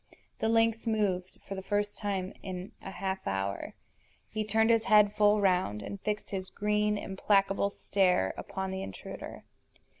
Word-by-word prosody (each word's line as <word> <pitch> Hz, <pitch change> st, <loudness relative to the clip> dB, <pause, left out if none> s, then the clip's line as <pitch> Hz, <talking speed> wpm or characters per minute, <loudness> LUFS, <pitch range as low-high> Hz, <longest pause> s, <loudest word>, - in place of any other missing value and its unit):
The 220 Hz, -, +1 dB
lynx 225 Hz, 0 st, +2 dB
moved, 195 Hz, -5 st, 0 dB
for 195 Hz, -, -4 dB
the 190 Hz, -, -4 dB
first 205 Hz, +1 st, -1 dB
time 195 Hz, -3 st, -2 dB
in 185 Hz, +1 st, -6 dB
a -, -, -7 dB
half 190 Hz, 0 st, -3 dB
hour. 95 Hz, 0 st, -2 dB, 0.6 s
He 215 Hz, -, -1 dB
turned 220 Hz, +2 st, +3 dB
his 230 Hz, -1 st, +3 dB
head 210 Hz, -1 st, +6 dB
full 210 Hz, 0 st, +4 dB
round, 180 Hz, -, +2 dB
and 200 Hz, -1 st, -6 dB
fixed 210 Hz, 0 st, -3 dB
his 190 Hz, -1 st, -3 dB
green, 210 Hz, 0 st, +1 dB
implacable 195 Hz, 0 st, +2 dB
stare 185 Hz, -, +1 dB
upon 190 Hz, -1 st, -4 dB
the 190 Hz, 0 st, -3 dB
intruder. 95 Hz, -, -8 dB
200 Hz, 155 wpm, -30 LUFS, 190-210 Hz, 0.6 s, head